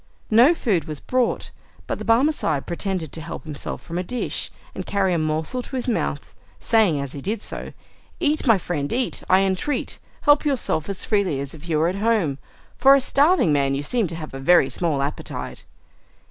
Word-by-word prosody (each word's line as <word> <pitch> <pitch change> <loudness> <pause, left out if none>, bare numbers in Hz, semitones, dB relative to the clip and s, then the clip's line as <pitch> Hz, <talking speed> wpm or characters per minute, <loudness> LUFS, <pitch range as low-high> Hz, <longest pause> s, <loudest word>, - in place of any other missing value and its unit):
No 245 +10 +6
food 190 - 0
was 155 -2 -5
brought, 255 -2 -1 0.3
but - - -3
the - - -6
Barmecide 230 - +2
pretended 175 -3 -3
to 160 - -6
help 165 - -7
himself 150 -3 -5
from 170 +1 -4
a - - -1
dish, 245 +6 -3 0.2
and - - -5
carry 195 -2 +1
a 170 - +1
morsel 155 +10 -1
to 265 - -8
his 255 - -2
mouth, 235 - -2 0.3
saying 210 -10 +3
as 140 -2 -4
he 140 - -7
did 215 +8 -2
so, - - -6 0.5
"Eat, 305 -3 +1
my 225 -3 +6
friend, 150 -6 -3
eat, 250 +1 -1
I 185 +1 +6
entreat. 195 +9 -1 0.2
Help 290 0 +5
yourself 255 - 0
as 195 - -3
freely 200 -10 +1
as 140 0 -5
if 160 +2 -11
you 155 - +2
were 160 +2 +3
at 185 +3 -2
home! 200 -10 +1 0.4
For 275 +1 +8
a - - +4
starving 280 - +3
man, 140 -1 +2
you 140 - -3
seem 225 +6 0
to 165 - -6
have 155 -3 -7
a 135 - -6
very 175 +7 +5
small 155 -6 0
appetite." 145 +2 -5
185 Hz, 200 wpm, -23 LUFS, 155-240 Hz, 0.5 s, For